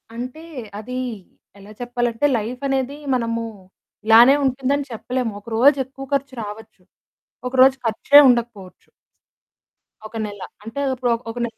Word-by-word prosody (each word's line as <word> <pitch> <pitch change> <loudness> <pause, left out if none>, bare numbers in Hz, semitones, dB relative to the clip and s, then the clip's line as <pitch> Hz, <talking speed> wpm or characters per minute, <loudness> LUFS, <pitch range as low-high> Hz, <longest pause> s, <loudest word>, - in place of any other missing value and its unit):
అంటే 255 +6 -6 0.4
అది 250 +4 -6 0.6
ఎలా 200 +2 -13
చెప్పాలంటే 240 +1 -1
లైఫనేది 265 +4 -2 0.2
మనము 230 -1 -1 0.6
ఇలానే 235 +5 +7
ఉంటుంది 265 +1 0
అని 285 - -4
చెప్పలేము. 245 +1 -3
ఒక 205 - -26
రోజు 280 +4 +5
ఎక్కువ 270 +1 -10
ఖర్చు 275 -1 -1
రావచ్చు, 210 -2 -10 0.7
ఒక 250 - -7
రోజు 265 0 +7
ఖర్చే 230 +6 +6
ఉండకపోవచ్చు. 230 -6 -2 1.2
ఒక 225 - -16
నెల 205 -2 -8 0.2
అంటే, 225 +6 -5
ఇప్పుడో 245 -1 -1 0.2
ఒక 240 - -12
నెల 230 - -9
245 Hz, 130 wpm, -21 LUFS, 225-265 Hz, 1.2 s, ఇలానే